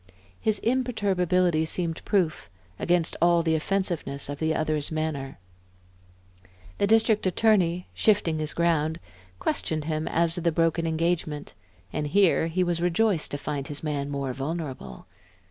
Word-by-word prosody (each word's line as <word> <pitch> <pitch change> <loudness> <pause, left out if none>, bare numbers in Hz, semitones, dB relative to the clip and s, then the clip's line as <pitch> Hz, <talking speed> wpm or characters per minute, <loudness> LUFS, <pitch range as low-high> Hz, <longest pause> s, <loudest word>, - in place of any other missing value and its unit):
His 215 -1 +3
imperturbability 185 -9 +1
seemed 165 -1 -1
proof, 180 - 0 0.3
against 175 -2 +1
all 170 0 +4
the 160 -1 +1
offensiveness 160 -5 -1
of 145 0 -5
the 160 0 0
other's 155 -2 0
manner. 155 -4 -3 1.4
The 200 - +2
District 220 0 +3
Attorney, 180 -3 +2
shifting 190 -7 +2
his 155 0 -3
ground, 165 -1 +1 0.4
questioned 155 - -1
him 155 0 -2
as 165 0 +2
to 175 - -3
the 170 0 +2
broken 165 0 +1
engagement; 160 -2 -1 0.4
and 150 -1 -2
here 175 0 +3
he 180 +3 0
was 175 -1 -1
rejoiced 180 0 +1
to 145 - -3
find 145 -1 -4
his 145 +1 -6
man 145 -2 -2
more 140 -2 -3
vulnerable. 135 - -5
165 Hz, 140 wpm, -26 LUFS, 155-180 Hz, 1.4 s, all